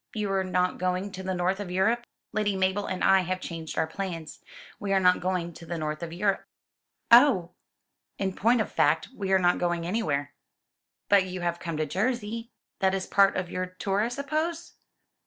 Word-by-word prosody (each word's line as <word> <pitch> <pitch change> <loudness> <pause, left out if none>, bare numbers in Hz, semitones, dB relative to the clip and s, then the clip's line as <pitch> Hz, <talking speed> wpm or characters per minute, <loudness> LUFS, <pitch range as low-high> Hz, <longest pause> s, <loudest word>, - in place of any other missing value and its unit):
"You 210 -2 -1
are 190 -1 +1
not 180 0 0
going 185 +2 -1
to 190 - -7
the 190 0 -2
north 180 +2 0
of 205 -3 -5
Europe?" 225 +7 +1 0.2
"Lady 210 -2 0
Mabel 190 +2 0
and 185 -1 -3
I 195 0 +6
have 185 0 -2
changed 165 -3 -6
our - - +3
plans. 165 -2 -6 0.4
We 200 -1 -1
are 195 - +4
not 180 -1 +4
going 180 -2 -2
to 165 - -12
the 170 +1 -3
north 155 0 -3
of 170 -1 -5
Europe." 195 +3 0 0.7
"Oh!" 235 -9 +6 0.7
"In 190 -1 -1
point 230 +4 +3
of - - -3
fact, 155 +2 +2
we 195 -2 -3
are 190 - +6
not 175 -1 +2
going 175 -1 0
anywhere." 155 -8 -1 0.7
"But 200 -2 +5
you 185 -1 -5
have 170 0 -1
come 165 -3 -4
to 155 - 0
Jersey. 230 - -2 0.3
That 190 0 +2
is 190 - -2
part 195 -1 +4
of 180 -1 -3
your 185 0 -2
tour, 195 +2 -1
I 220 - +1
suppose?" 310 +6 -3
190 Hz, 195 wpm, -27 LUFS, 175-205 Hz, 0.7 s, I